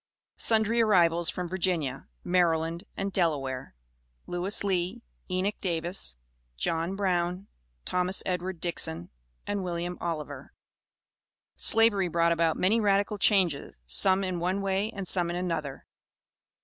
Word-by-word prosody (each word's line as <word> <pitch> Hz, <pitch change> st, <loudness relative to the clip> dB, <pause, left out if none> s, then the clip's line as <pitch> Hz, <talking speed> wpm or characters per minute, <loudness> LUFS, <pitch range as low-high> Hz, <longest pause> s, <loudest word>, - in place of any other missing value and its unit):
SUNDRY 225 Hz, +1 st, +2 dB
ARRIVALS 175 Hz, -6 st, +4 dB
FROM 180 Hz, -1 st, -3 dB
VIRGINIA, 170 Hz, -7 st, -1 dB, 0.2 s
MARYLAND 170 Hz, 0 st, +1 dB
AND 195 Hz, 0 st, -3 dB
DELAWARE. 135 Hz, -, -1 dB, 0.5 s
LEWIS 180 Hz, +4 st, +1 dB
LEE, 190 Hz, +4 st, -1 dB, 0.3 s
ENOCH 185 Hz, +3 st, -1 dB
DAVIS, 170 Hz, -, -3 dB, 0.4 s
JOHN 165 Hz, -, -1 dB
BROWN, 180 Hz, -1 st, -1 dB, 0.4 s
THOMAS 180 Hz, +1 st, 0 dB
EDWARD 180 Hz, -1 st, -3 dB
DIXON, 90 Hz, -, -1 dB, 0.3 s
AND 205 Hz, -1 st, -2 dB
WILLIAM 175 Hz, 0 st, -4 dB
OLIVER. 165 Hz, -3 st, -5 dB, 1.0 s
Slavery 220 Hz, -4 st, +4 dB
brought 170 Hz, 0 st, +2 dB
about 165 Hz, -1 st, +1 dB
many 210 Hz, +5 st, +2 dB
radical 205 Hz, 0 st, +1 dB
changes, 185 Hz, -9 st, +2 dB
some 185 Hz, -, +4 dB
in 185 Hz, -2 st, -2 dB
one 185 Hz, +3 st, -1 dB
way 195 Hz, +2 st, 0 dB
and 195 Hz, -4 st, -6 dB
some 175 Hz, -2 st, +3 dB
in 175 Hz, -, -3 dB
another. 165 Hz, -6 st, -3 dB
180 Hz, 120 wpm, -28 LUFS, 170-195 Hz, 1.0 s, ARRIVALS